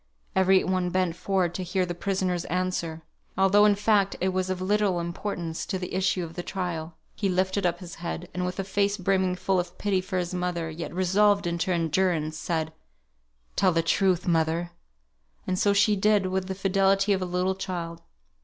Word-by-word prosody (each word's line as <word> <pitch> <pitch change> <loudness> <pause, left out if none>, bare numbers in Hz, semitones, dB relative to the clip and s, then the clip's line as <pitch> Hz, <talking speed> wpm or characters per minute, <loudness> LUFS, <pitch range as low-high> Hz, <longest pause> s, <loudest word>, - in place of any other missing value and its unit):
Every 190 0 +4
one 185 -1 0
bent 185 -2 0
forward 185 -2 0
to 185 - -4
hear 180 +1 0
the 175 - -4
prisoner's 185 -1 -1
answer; 170 -3 -2 0.3
although, 195 +2 +5
in 205 -1 +5
fact, 205 -1 +2
it 190 - +1
was 185 0 -1
of 185 -1 -2
little 195 -1 +1
importance 170 -1 -4
to 190 - -1
the 180 -1 -6
issue 185 -1 +1
of 165 -1 -7
the 175 - -4
trial. 175 -4 -4 0.2
He 200 - -1
lifted 190 +1 +1
up 175 0 -1
his 175 -2 -8
head; 175 0 -4
and 180 - -2
with 180 +1 -3
a - - 0
face 200 +1 0
brimming 185 -1 +1
full 185 +1 0
of 175 - -5
pity 195 -2 0
for 185 0 -4
his 180 0 -2
mother, 175 -2 -2
yet 160 -1 -6
resolved 200 +3 +3
into 170 +1 -1
endurance, 165 -2 +1
said, 160 0 -2 0.8
"Tell 190 -2 +3
the 165 -1 +1
truth, 185 +1 +2
mother!" 165 +1 +1 0.7
And 185 0 -1
so 205 - +3
she 205 +1 +4
did, 205 0 +3
with 185 0 -1
the 190 - -3
fidelity 195 +1 +2
of 190 - -1
a - - -1
little 180 +1 0
child. 175 -3 -5
185 Hz, 190 wpm, -26 LUFS, 175-195 Hz, 0.8 s, although